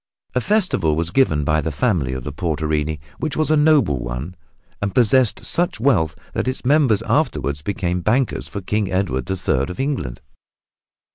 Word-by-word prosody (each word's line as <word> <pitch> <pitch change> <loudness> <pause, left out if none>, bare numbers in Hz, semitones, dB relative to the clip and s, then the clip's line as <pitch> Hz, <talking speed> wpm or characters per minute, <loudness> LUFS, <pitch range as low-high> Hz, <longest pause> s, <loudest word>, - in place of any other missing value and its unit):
A 125 - +1
festival 185 - +1
was 85 +1 -1
given 85 - +2
by 75 +2 +1
the 80 +2 -2
family 75 - 0
of 65 -1 -5
the 75 - -6
Portinari 80 -2 -1 0.2
which 155 - -3
was 155 0 +1
a - - +5
noble 150 - +3
one 60 +8 -5 0.5
and 105 +1 -2
possessed 125 -1 +3
such 175 -8 +1
wealth 115 - +2 0.2
that - - -2
its 130 0 -3
members 135 -6 +3
afterward 70 +1 0
became 90 -1 -2
bankers 120 +6 0
for 100 - -5
King 105 +1 -1
Edward 65 -10 -1
the 95 - -2
Third 70 -6 0
of 90 - -7
England. 130 - -2
95 Hz, 170 wpm, -20 LUFS, -, 0.5 s, a